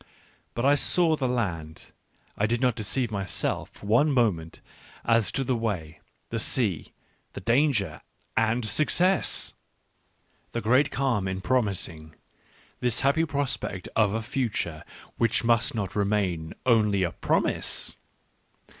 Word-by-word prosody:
But 120 - -1
I 140 - +6
saw 160 +3 +4
the 135 -4 -1
land 85 -11 -3 0.2
— - - -37
I 105 - +1
did 120 +2 0
not 125 -1 +2
deceive 115 +2 -1
myself 100 -3 -2
for - - -14
one 120 +9 +3
moment 100 - 0 0.5
as 115 -2 +2
to 135 - 0
the 130 -1 0
way, 95 -9 -3 0.3
the 115 - -1
sea, 110 - +1 0.4
the - - -6
danger 120 +1 +1 0.2
— - - -41
and 115 +1 +1
success! 170 - +1 1.0
The 120 - -2
great 130 +6 +3
calm 120 -9 0
in 95 0 -3
promising, 90 -8 -1 0.6
this 125 -1 +1
happy 140 +4 +2
prospect 140 - -2
of 105 -2 +3
a 110 - -2
future 105 - -2 0.4
which 115 - +2
must 115 0 +2
not 100 -4 -3
remain 100 -6 -1
only 105 -5 +3
a 85 - 0
promise - - 0
115 Hz, 135 wpm, -26 LUFS, 100-130 Hz, 1.0 s, I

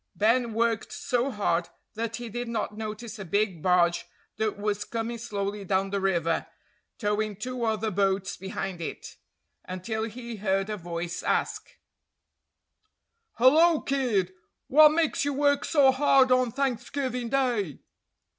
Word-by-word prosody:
Ben 230 +2 +2
worked 230 -1 0
so 250 +2 -1
hard 175 -7 0 0.2
that 230 +1 -3
he 240 0 -6
did 240 +2 -4
not 220 -2 -3
notice 220 +1 -6
a - - -4
big 190 -1 0
barge 175 -1 +2 0.3
that 220 -2 -1
was 205 0 -1
coming 230 0 -4
slowly 205 -3 -3
down 195 0 0
the 200 -1 -1
river, 170 -4 0 0.5
towing 210 -1 -1
two 250 +4 -4
other 220 0 0
boats 195 0 0
behind 190 -1 -5
it, 165 - -7 0.5
until 220 +5 -3
he 235 0 -7
heard 195 0 0
a - - -1
voice 170 -1 -4
ask: - - -2 1.6
"Hullo, 310 +6 +5
kid! 230 -10 0 0.3
What 305 +3 +7
makes 320 0 +1
you 285 0 0
work 285 +1 +2
so 280 -4 +5
hard 265 -1 +4
on 255 -1 +3
Thanksgiving 255 -1 -2
day?" 240 - 0
220 Hz, 135 wpm, -27 LUFS, 195-250 Hz, 1.6 s, What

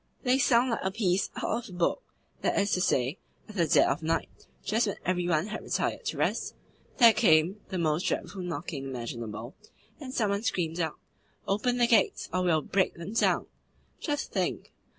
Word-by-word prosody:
They 255 0 +3
sound 250 -1 +4
like 230 - 0
a 190 - 0
piece 195 -2 0
out 240 -1 -2
of 180 - -10
a - - -9
book. 175 - +1 0.4
That - - 0
is 200 0 +1
to 180 - +1
say, 130 -1 +1 0.3
at 215 - -11 0.2
dead - - +5
of - - 0
night, 160 +1 -3 0.2
just 220 +3 +1
when 200 - -2
every 180 -1 0
one 165 -1 +2
had 215 - -5
retired - - -2
to 450 - -2
rest, - - -1 0.4
there 235 -4 +8
came 190 -2 +3
the 190 - -3
most 160 0 +1
dreadful 195 - -2
knocking 165 -5 -4
imaginable, 120 -2 -6 0.5
and 265 -3 -7
some 215 -5 +1
one 200 0 0
screamed 175 -7 -1
out, 160 -3 -1 0.5
'Open 230 +5 +1
the 240 - +4
gates, 230 -5 +2
or 185 - +1
we 180 - 0
will 160 -3 +2
break 190 -1 +1
them 170 +5 -7
down!' 230 - +2 0.5
Just 290 -2 -3
think! - - -2
185 Hz, 190 wpm, -29 LUFS, 165-225 Hz, 0.5 s, there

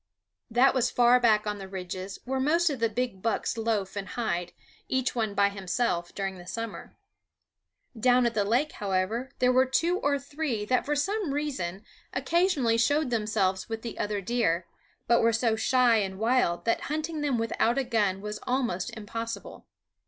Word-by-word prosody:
That 245 +4 +4
was 255 -2 +2
far 245 +1 +5
back 215 -3 +3
on 210 -1 -3
the 195 - -7
ridges, 185 0 -6
where 265 +1 -1
most 325 +5 +3
of 270 - -4
the 230 0 +2
big 235 -3 -3
bucks 230 +1 -1
loaf 220 -4 -1
and 200 -1 -4
hide, 180 -7 -2 0.4
each 260 -1 0
one 220 -4 -1
by 200 0 +4
himself, 190 -2 -1
during 195 -2 -3
the 175 - -12
summer. 230 +3 -6 1.0
Down 245 +2 +4
at 235 - +1
the 210 -2 +1
lake, 245 +9 +1
however, 205 +6 -1
there 250 0 +3
were 260 +1 +4
two 340 +8 +1
or 285 0 +1
three 280 -6 -3
that 255 +5 +1
for 295 - +1
some 370 0 -1
reason 215 -11 -3 0.3
occasionally 300 -10 +2
showed 290 +2 +2
themselves 210 -4 0
with 225 0 -4
the 230 - -6
other 205 -1 -1
deer, 185 -6 0 0.4
but 235 0 +4
were 230 - +4
so 230 0 +1
shy 245 0 +3
and 190 -2 -2
wild 225 -5 +1
that 230 - +1
hunting 310 +1 -2
them 280 -4 +1
without 230 +1 +1
a 275 - +2
gun 210 -6 0
was 210 0 -5
almost 245 -8 0
impossible. 230 +2 -6
230 Hz, 175 wpm, -28 LUFS, 200-260 Hz, 1.0 s, far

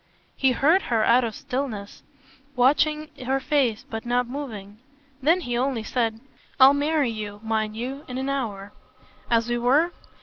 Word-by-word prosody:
He 265 -2 +2
heard 315 +10 +4
her 225 -2 +2
out 245 +2 +5
in 230 - -1
stillness, 250 -4 -5 0.5
watching 300 +4 +2
her 265 +2 0
face 265 -6 0
but 225 0 -5
not 245 +1 +1
moving. 220 -7 -7 0.4
Then 330 +7 +3
he 245 -6 -3
only 250 -2 0
said: 225 -1 -1 0.4
"I'll 265 +1 +9
marry 290 -2 +1
you, 210 -2 -6
mind 220 -1 -1
you, 265 +5 -5
in 250 - -5
an 265 +1 -2
hour." 215 -8 -3 0.6
"As 230 0 +2
we 240 0 -1
were?" 285 +8 +3
250 Hz, 160 wpm, -24 LUFS, 225-275 Hz, 0.6 s, I'll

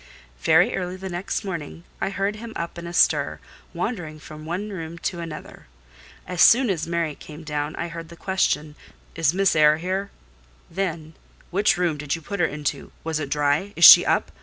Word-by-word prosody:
Very 160 - +4
early 180 -1 -3
the 190 0 -7
next 180 +4 -3
morning 170 -3 -6 0.2
I - - 0
heard 200 +1 -2
him 225 +1 -8
up 170 +1 -5
and 170 - -7
astir, 175 - +2 0.3
wandering 160 -9 -4
from 155 0 -11
one 195 +5 -4
room 165 -3 -6
to 175 +1 -4
another. 165 -2 -9 0.6
As 180 -1 -2
soon 240 -2 +6
as 165 -4 -3
Mary 170 -2 -1
came 150 +2 -12
down 150 0 -3
I 170 - -3
heard 165 -1 -8
the 170 - -11
question: 155 -5 -1 0.4
"Is 160 -2 +2
Miss 195 0 +2
Eyre 155 0 +5
here?" 190 +4 -3 0.6
Then: 165 -3 -3 0.4
"Which 200 +1 +2
room 175 -4 0
did 150 0 -2
you 165 - -9
put 200 +4 -5
her 170 - +3
into? 150 -2 -4
Was 160 -1 -2
it 145 -2 -4
dry? 150 +7 0
Is 170 - +6
she - - +11
up? - - 0
170 Hz, 185 wpm, -23 LUFS, 155-190 Hz, 0.6 s, she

